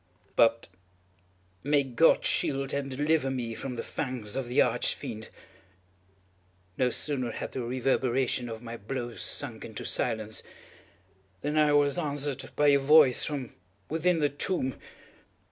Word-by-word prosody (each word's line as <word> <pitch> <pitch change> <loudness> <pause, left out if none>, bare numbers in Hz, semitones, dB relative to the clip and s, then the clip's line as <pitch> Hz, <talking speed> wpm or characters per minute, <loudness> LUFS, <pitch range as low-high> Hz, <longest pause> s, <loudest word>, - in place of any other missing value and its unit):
But 115 0 +3 0.9
may 145 0 +2
God 135 +5 +3
shield 135 -1 0
and 140 -1 -2
deliver 145 +1 +1
me 120 -3 -3
from 125 +2 -5
the - - -4
fangs 125 -7 -4
of 135 -2 -2
the 125 - 0
Arch - - +3
Fiend! 110 0 -7 1.5
No 125 +2 +2
sooner 130 -1 -1
had - - -5
the 130 - -4
reverberation 125 0 0
of 115 +1 -7
my 115 0 -6
blows 120 +2 -5
sunk - - -3
into - - -7
silence, 110 -2 -1 1.0
than 150 +1 -2
I 150 -1 +4
was 145 +3 +3
answered 145 -3 -2
by 145 0 +4
a 140 0 +5
voice 140 -2 +6
from 140 -5 -4 0.4
within 165 +3 +1
the 145 - +3
tomb! 145 -2 -2
135 Hz, 140 wpm, -28 LUFS, 120-145 Hz, 1.5 s, voice